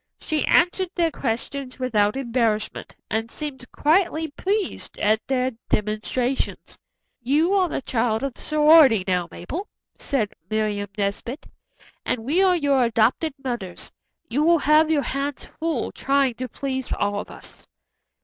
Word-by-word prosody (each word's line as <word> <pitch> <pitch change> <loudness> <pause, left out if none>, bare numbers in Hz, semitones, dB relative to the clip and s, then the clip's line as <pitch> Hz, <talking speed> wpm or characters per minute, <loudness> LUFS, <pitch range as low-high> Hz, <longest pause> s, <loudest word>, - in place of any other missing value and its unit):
She 310 -1 -1
answered 360 +1 +3
their 335 -2 +2
questions 255 +1 -4
without 215 -5 +1
embarrassment, 230 -4 -1 0.2
and 225 +1 -1
seemed 265 -2 -7
quietly 320 0 +2
pleased 395 +7 -3
at 215 +1 +2
their 260 -1 +1 0.2
demonstrations. 215 +5 -2 0.4
"You 300 +9 +2
are 375 -3 +3
the 270 - -3
child 225 -1 0
of 275 -2 -2
the - - -14
sorority 300 - +6
now, 180 -2 +1
Mabel," 330 - -6 0.3
said 235 -8 -1 0.2
Miriam 210 -2 -1
Nesbit, 205 +7 -3 0.6
"and 225 - -2
we 320 +8 +2
are 370 -2 +5
your 280 -4 +2
adopted 235 +6 +1
mothers. 235 -9 -5 0.4
You 280 +2 0
will 335 +2 +5
have 305 +1 +4
your 300 -3 +2
hands 275 +3 -3
full 320 -6 -3
trying 275 -2 +1
to 255 +2 -6
please 265 -2 -4
all 205 0 -1
of - - -7
us." - - -10
265 Hz, 140 wpm, -23 LUFS, 225-305 Hz, 0.6 s, sorority